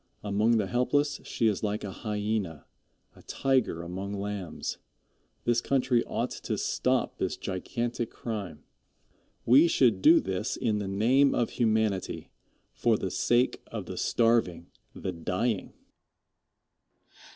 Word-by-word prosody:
Among 105 Hz, +3 st, +2 dB
the 105 Hz, -, +1 dB
helpless 140 Hz, +6 st, 0 dB
she 115 Hz, -, -1 dB
is 105 Hz, -3 st, +2 dB
like 105 Hz, 0 st, -2 dB
a 100 Hz, -, -4 dB
hyena 105 Hz, -6 st, -3 dB, 0.5 s
a -, -, -16 dB
tiger 130 Hz, -11 st, 0 dB
among 95 Hz, +4 st, -5 dB
lambs. 100 Hz, -4 st, -4 dB, 0.6 s
This 120 Hz, 0 st, +2 dB
country 125 Hz, -3 st, +2 dB
ought -, -, -2 dB
to -, -, -4 dB
stop -, -, 0 dB
this -, -, -1 dB
gigantic 120 Hz, +5 st, -3 dB
crime. 100 Hz, -10 st, -6 dB, 0.8 s
We 135 Hz, +8 st, +7 dB
should 120 Hz, -, +3 dB
do 165 Hz, -, +7 dB
this 95 Hz, +4 st, -3 dB
in 110 Hz, -3 st, 0 dB
the 100 Hz, -, -3 dB
name 125 Hz, +8 st, +3 dB
of 120 Hz, -, 0 dB
humanity 110 Hz, -4 st, 0 dB, 0.4 s
for -, -, +2 dB
the -, -, -3 dB
sake 120 Hz, +2 st, +1 dB
of -, -, -6 dB
the -, -, -6 dB
starving, 115 Hz, -8 st, +1 dB, 0.2 s
the 95 Hz, -, -4 dB
dying. 90 Hz, +5 st, -2 dB
110 Hz, 130 wpm, -28 LUFS, 95-120 Hz, 0.8 s, We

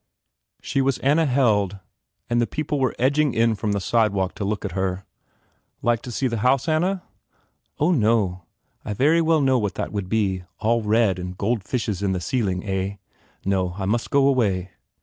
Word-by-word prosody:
She 135 Hz, -, 0 dB
was 135 Hz, -1 st, +1 dB
Anna 150 Hz, +4 st, +2 dB
Held 105 Hz, -7 st, +2 dB, 0.5 s
and 120 Hz, 0 st, +1 dB
the 120 Hz, -, +1 dB
people 150 Hz, -1 st, -2 dB
were 130 Hz, -2 st, 0 dB
edging 140 Hz, +2 st, +2 dB
in 115 Hz, 0 st, +3 dB
from 105 Hz, 0 st, -2 dB
the 100 Hz, -, 0 dB
sidewalk 100 Hz, -3 st, +1 dB
to 105 Hz, -, -5 dB
look 100 Hz, +1 st, -2 dB
at 100 Hz, -, -3 dB
her. 95 Hz, +1 st, -2 dB, 0.8 s
"Like 120 Hz, -1 st, +2 dB
to 125 Hz, -, -7 dB
see 130 Hz, -, -2 dB
the 115 Hz, -2 st, -2 dB
house, 130 Hz, +5 st, +2 dB
Anna?" 175 Hz, +4 st, +1 dB, 0.7 s
"Oh, 155 Hz, +5 st, +2 dB
no. 105 Hz, -, +1 dB, 0.4 s
I 105 Hz, -, -4 dB
very 155 Hz, +9 st, +3 dB
well 160 Hz, -1 st, +3 dB
know 130 Hz, -2 st, +3 dB
what 105 Hz, -3 st, -2 dB
that -, -, -3 dB
would 100 Hz, -3 st, -4 dB
be. 95 Hz, -4 st, 0 dB
All 115 Hz, +2 st, +1 dB
red, 105 Hz, -3 st, +2 dB
and 90 Hz, 0 st, -6 dB
gold 110 Hz, 0 st, -1 dB
fishes 105 Hz, -4 st, -2 dB
on 100 Hz, -2 st, 0 dB
the 90 Hz, -, -1 dB
ceiling, 95 Hz, -2 st, -1 dB
eh? 95 Hz, 0 st, -2 dB, 0.5 s
No. 95 Hz, -2 st, 0 dB
I 95 Hz, -, -3 dB
must 115 Hz, +4 st, -1 dB
go 140 Hz, -1 st, +4 dB
away." 100 Hz, -9 st, +1 dB
110 Hz, 190 wpm, -23 LUFS, 95-130 Hz, 0.8 s, go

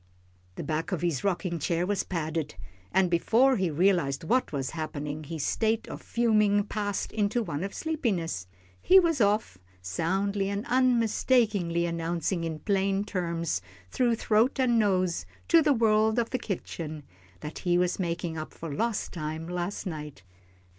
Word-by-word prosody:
The -, -, -5 dB
back 160 Hz, +4 st, -2 dB
of 175 Hz, -3 st, -2 dB
his 165 Hz, -7 st, 0 dB
rocking 175 Hz, -3 st, -1 dB
chair 170 Hz, +3 st, 0 dB
was 200 Hz, 0 st, 0 dB
padded, 160 Hz, -3 st, -3 dB, 0.4 s
and 190 Hz, 0 st, +3 dB
before 230 Hz, +10 st, +3 dB
he 185 Hz, -3 st, +1 dB
realised 165 Hz, -4 st, +2 dB
what 250 Hz, +10 st, +1 dB
was 135 Hz, -3 st, -2 dB
happening, 155 Hz, -1 st, -5 dB
his 155 Hz, -1 st, -4 dB
state 225 Hz, 0 st, 0 dB
of -, -, -7 dB
fuming 210 Hz, -3 st, +2 dB
passed 205 Hz, -1 st, -3 dB
into 215 Hz, +2 st, 0 dB
one 145 Hz, -4 st, -4 dB
of 195 Hz, -, -3 dB
sleepiness, 195 Hz, -, -2 dB, 0.3 s
he 380 Hz, +1 st, +7 dB
was 330 Hz, -7 st, +1 dB
off, 205 Hz, -, +1 dB, 0.2 s
soundly 195 Hz, -, -1 dB
and 200 Hz, +2 st, -3 dB
unmistakably 230 Hz, -7 st, +2 dB
announcing 170 Hz, +1 st, -1 dB
in 160 Hz, -1 st, -3 dB
plain 195 Hz, -1 st, +1 dB
terms, 170 Hz, -, -2 dB, 0.3 s
through 240 Hz, -2 st, +2 dB
throat 225 Hz, +4 st, +2 dB
and 240 Hz, -3 st, +3 dB
nose, 185 Hz, -4 st, +1 dB, 0.2 s
to 335 Hz, -1 st, +7 dB
the 300 Hz, -1 st, +3 dB
world 220 Hz, -2 st, +3 dB
of 235 Hz, -1 st, 0 dB
the 255 Hz, -, -1 dB
kitchen, 160 Hz, -7 st, -5 dB, 0.4 s
that 150 Hz, -, -6 dB
he 175 Hz, -2 st, +2 dB
was 180 Hz, +1 st, +1 dB
making 170 Hz, -2 st, -2 dB
up 155 Hz, -, -7 dB
for 165 Hz, -, -6 dB
time 140 Hz, -, -5 dB
lost 230 Hz, -4 st, -1 dB
last 170 Hz, +5 st, -4 dB
night. 150 Hz, -, -6 dB
185 Hz, 155 wpm, -28 LUFS, 165-220 Hz, 0.4 s, he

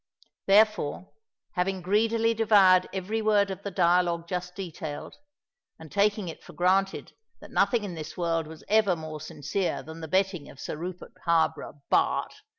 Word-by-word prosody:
Therefore, 200 Hz, -4 st, +3 dB, 0.4 s
having 185 Hz, 0 st, -1 dB
greedily 225 Hz, +4 st, +2 dB
devoured 200 Hz, -5 st, +5 dB
every 195 Hz, +4 st, -2 dB
word 205 Hz, -2 st, +3 dB
of 190 Hz, -, -6 dB
the 200 Hz, -, -4 dB
dialogue 175 Hz, -2 st, +2 dB
just 180 Hz, 0 st, -4 dB
detailed, 160 Hz, -5 st, -7 dB, 0.6 s
and 160 Hz, -2 st, -12 dB
taking 205 Hz, -1 st, +1 dB
it 165 Hz, -, -8 dB
for -, -, -13 dB
granted 190 Hz, +2 st, +1 dB, 0.3 s
that -, -, -13 dB
nothing 235 Hz, -4 st, +2 dB
in 195 Hz, -3 st, -5 dB
this 155 Hz, -2 st, -8 dB
world 165 Hz, -2 st, 0 dB
was 160 Hz, 0 st, -11 dB
ever 215 Hz, -4 st, +3 dB
more 155 Hz, -2 st, -7 dB
sincere 155 Hz, +2 st, -3 dB
than 160 Hz, +3 st, -10 dB
the 160 Hz, -, -5 dB
betting 185 Hz, -3 st, 0 dB
of 135 Hz, -, -14 dB
Sir -, -, -5 dB
Rupert 180 Hz, +3 st, -7 dB
Harborough, 160 Hz, -3 st, 0 dB
Bart. -, -, +2 dB
180 Hz, 155 wpm, -27 LUFS, 165-200 Hz, 0.6 s, devoured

